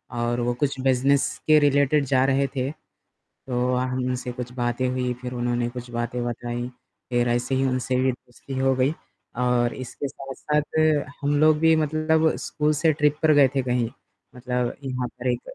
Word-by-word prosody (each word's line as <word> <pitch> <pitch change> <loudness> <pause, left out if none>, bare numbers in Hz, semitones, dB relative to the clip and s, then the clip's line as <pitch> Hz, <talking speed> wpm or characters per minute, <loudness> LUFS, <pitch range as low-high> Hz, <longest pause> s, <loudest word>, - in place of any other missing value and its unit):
और 120 +1 -1
वो 120 +1 0
कुछ 135 +1 -2
बिज़नेस 135 +1 +2
के 155 0 +7
रिलेटेड 145 0 +3
जा 130 0 +3
रहे 135 0 +2
थे, 130 +1 -1
तो 125 -4 -6
अ, - - +1
हमसे 125 -1 -2
कुछ 125 0 -6
बातें 120 0 -1
हुई 125 -1 -1
फिर 125 0 -5
उन्होंने 120 -1 -1
कुछ 125 0 -8
बातें 120 +1 -2
बताई 120 0 -4 0.4
फ़िर 120 0 +2
एसे 120 +2 0
ही 135 - +1
उनसे 130 0 -1 0.2
दोस्ती 125 +2 -10
हो 135 0 +3
गई, 130 +4 +2 0.4
और 125 -1 +2
इसके 130 +2 -5
साथ-साथ 145 +3 -2 0.4
हम 145 +1 +1
लोग 155 -1 +5
भी 160 0 +5
मतलब 155 +1 +2
स्कूल 150 0 0
से 155 +1 +2
ट्रिप 150 0 +1
पर 155 - +6
गए 145 -2 +6
थे 135 - +2
कहीं। 125 -2 0 0.5
मतलब 125 -1 -2
यहाँ 125 -2 -2
पर 125 +2 -7
एक 120 0 -3
130 Hz, 175 wpm, -24 LUFS, 125-140 Hz, 0.5 s, के